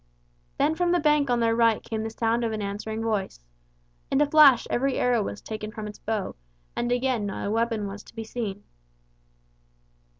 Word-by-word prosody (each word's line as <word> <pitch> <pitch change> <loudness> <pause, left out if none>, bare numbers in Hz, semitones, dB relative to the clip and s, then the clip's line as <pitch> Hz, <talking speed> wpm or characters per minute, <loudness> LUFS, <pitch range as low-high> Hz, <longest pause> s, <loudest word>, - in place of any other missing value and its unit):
Then 305 - +2
from 350 +1 +1
the 355 - +3
bank 295 -3 +3
on 245 -1 +2
their 230 0 +2
right 230 -1 +3
came 220 -1 -3
the 220 - -3
sound 225 +1 0
of 230 - 0
an 215 - -3
answering 215 +2 -4
voice. 210 - -2 0.7
In 270 - +2
a 295 - +5
flash 290 -4 +6
every 265 +2 0
arrow 245 -2 +2
was 205 - -5
taken 215 -1 -6
from 215 0 -6
its 210 0 -8
bow, 215 -3 -3 0.4
and 240 0 -1
again 245 -4 0
not 195 - -4
a 200 - -1
weapon 225 -1 0
was 200 +1 -7
to - - -17
be 225 - -4
seen. 215 -3 -5
225 Hz, 195 wpm, -26 LUFS, 215-250 Hz, 0.7 s, flash